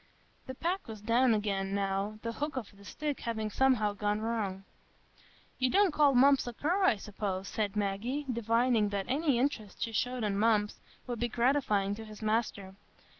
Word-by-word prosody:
The 260 - -6
pack 355 +7 -2
was 220 -2 -7
down 230 +3 +3
again, 195 -2 -1
now, 200 +1 -1
the 230 - -2
hook 290 +4 -4
of 210 -5 -6
the 200 - -16
stick 295 +7 -4
having 220 -2 -3
somehow 245 -6 +2
gone 205 +1 -1
wrong. 215 -4 -2 1.0
"You 255 0 +2
don't 390 +1 +3
call 290 -3 +4
Mumps 275 +1 +5
a 240 - -4
cur, 350 - 0
I 305 - +5
suppose?" 200 -2 -4
said 210 -1 -2
Maggie, 210 +8 -2
divining 230 -1 +2
that 200 -1 -2
any 285 -1 +1
interest 240 -6 -2
she 230 - -3
showed 245 +2 -1
in 200 -1 0
Mumps 210 -1 +2 0.3
would 245 -2 -4
be 240 - +1
gratifying 235 -5 +1
to 220 +2 -7
his 215 0 -11
master. 215 -3 -1
225 Hz, 175 wpm, -31 LUFS, 205-255 Hz, 1.0 s, Mumps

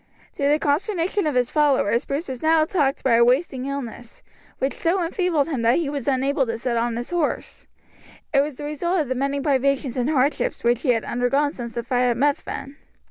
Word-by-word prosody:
To 280 -1 0
the 295 - +4
consternation 335 +5 0
of 295 - -1
his 245 -1 +1
followers 275 -6 +2
Bruce 285 +5 -3
was 260 -2 -6
now 320 0 +4
attacked 295 -5 0
by 235 -3 +4
a 235 - +6
wasting 260 +1 +1
illness, 245 -4 -7 0.3
which 270 +1 -1
so 350 +2 0
enfeebled 335 -4 0
him 275 -7 -2
that 230 +1 +3
he 320 -4 -1
was 280 -4 -4
unable 270 0 +1
to 230 0 -2
sit 240 +1 -2
on 230 0 0
his 240 +5 -5
horse; 340 -4 -2 0.7
it 275 - +5
was 285 -2 -4
the - - -7
result 325 +4 -1
of 285 - -4
the - - +1
many 275 +2 -1
privations 275 -2 0
and 250 +2 0
hardships 280 -1 0
which 240 +1 +2
he 265 - -2
had 230 -2 +2
undergone 275 +4 +1
since 235 -5 -7
the 235 - -2
fight 250 +1 +1
at 235 - 0
Methven. 280 0 -2
275 Hz, 210 wpm, -23 LUFS, 245-300 Hz, 0.7 s, a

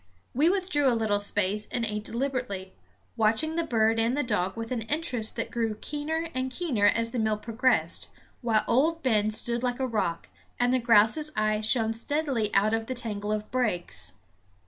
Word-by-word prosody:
We 295 +7 +3
withdrew 365 -7 +2
a 240 -3 +3
little 210 -2 +1
space 205 0 0
and 240 -2 0
ate 210 -1 -3
deliberately, 235 -6 -3 0.4
watching 230 +8 +1
the 335 - +1
bird 225 -5 +2
and 230 +4 +1
the 290 - +1
dog 190 -4 -1
with 230 +1 -5
an 245 -3 -1
interest 250 -3 -1
that 230 - -3
grew 225 -2 -1
keener 305 +7 -3
and 255 0 -2
keener 255 -8 +1
as 230 +2 +1
the 245 - -2
meal 220 -1 +1
progressed, 225 -6 +1 0.3
while 225 -3 +2
Old 320 +7 +2
Ben 215 -5 +2
stood 235 +2 -2
like 245 0 -1
a 265 - 0
rock, 210 -9 -2 0.3
and 245 0 +2
the 255 - +3
grouse's 235 +6 +4
eye 215 0 +1
shone 225 0 +3
steadily 250 -3 -1
out 210 +2 +3
of 225 0 -1
the 255 - -3
tangle 210 -3 -3
of 215 0 -3
brakes. 175 - -1
230 Hz, 185 wpm, -27 LUFS, 215-260 Hz, 0.4 s, grouse's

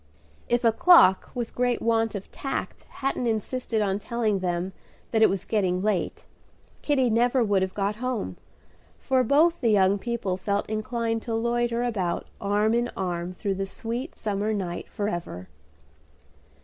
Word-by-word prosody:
If 240 +1 +2
a 230 - +5
clock 225 - +6
with 240 -2 -3
great 245 0 +1
want 225 -1 +1
of 200 - -7
tact 270 - -5
hadn't 270 -2 -2
insisted 225 0 -1
on 195 0 0
telling 220 -2 -1
them 180 +1 -2 0.4
that 220 - +2
it 220 - +7
was 195 -2 -2
getting 185 -4 0
late, 210 -3 -1 0.6
Kitty 265 -5 +2
never 240 +3 +3
would 200 -3 +2
have 190 0 -2
got 205 +1 -1
home, 240 - -3 0.6
for 260 -1 +1
both 315 +7 +3
the 235 - +2
young 200 -1 +4
people 220 -5 -2
felt 200 +2 -1
inclined 225 +1 -2
to 230 0 -3
loiter 235 +1 0
about 195 -8 -1 0.2
arm 210 +2 +2
in 240 +1 +1
arm 180 -1 -3
through 200 +1 -2
the 195 0 -3
sweet 235 - -5
summer 210 0 -2
night 180 -4 -4
forever. 175 - -4
220 Hz, 155 wpm, -26 LUFS, 195-240 Hz, 0.6 s, it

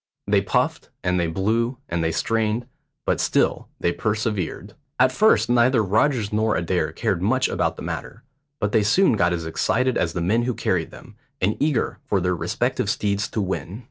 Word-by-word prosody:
They - - +3
puffed, - - -1
and 90 0 +1
they 85 - +1
blew, 115 +8 0
and 85 -1 -1
they 80 - +1
strained, 110 +6 0 0.4
but - - +1
still - - +1
they 85 - +1
persevered. 105 0 -2 0.3
At 130 0 +5
first 215 +12 +4
neither 120 -1 +3
Rogers 110 +2 +1
nor 110 0 +2
Adair 85 - 0
cared 85 - -1
much 130 +7 +2
about - - -1
the - - -8
matter, 115 - -6 0.4
but 105 - -1
they 110 - +3
soon 120 - +4
got 90 -5 +2
as 85 -2 -2
excited 125 +10 0
as 85 - 0
the - - -2
men 105 +7 +2
who 120 0 -1
carried 85 -3 -1
them, - - -14 0.2
and 100 +4 +1
eager 145 -5 0
for 100 - +1
their 90 0 0
respective - - -1
steeds 100 0 0
to 110 - -2
win. 95 +1 -4
105 Hz, 185 wpm, -23 LUFS, 90-120 Hz, 0.4 s, At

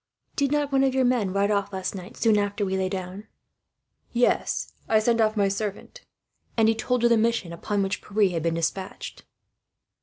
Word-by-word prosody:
"Did 280 -1 +1
not 295 -1 0
one 270 0 +3
of 265 -1 +1
your 260 -1 +3
men 240 -6 +1
ride 200 +2 +1
off, 200 -1 0
last 190 -1 -3
night, 185 -2 -9
soon 220 -1 +3
after 205 0 -1
we 190 0 -1
lay 190 0 0
down?" 190 +2 -6 0.8
"Yes, 245 0 +1 0.2
I 220 - +5
sent 230 +1 +2
off 215 0 +2
my 200 -1 +3
servant." 205 - -4 0.6
And 225 -1 +4
he 225 - +4
told 240 +2 -1
her - - +6
the 235 -1 +4
mission 225 -6 0
upon 200 +4 -1
which 195 +1 -2
Pierre 205 -2 +1
had 165 -2 -2
been 165 +1 0
despatched. 185 +4 -4
205 Hz, 195 wpm, -25 LUFS, 190-235 Hz, 0.8 s, her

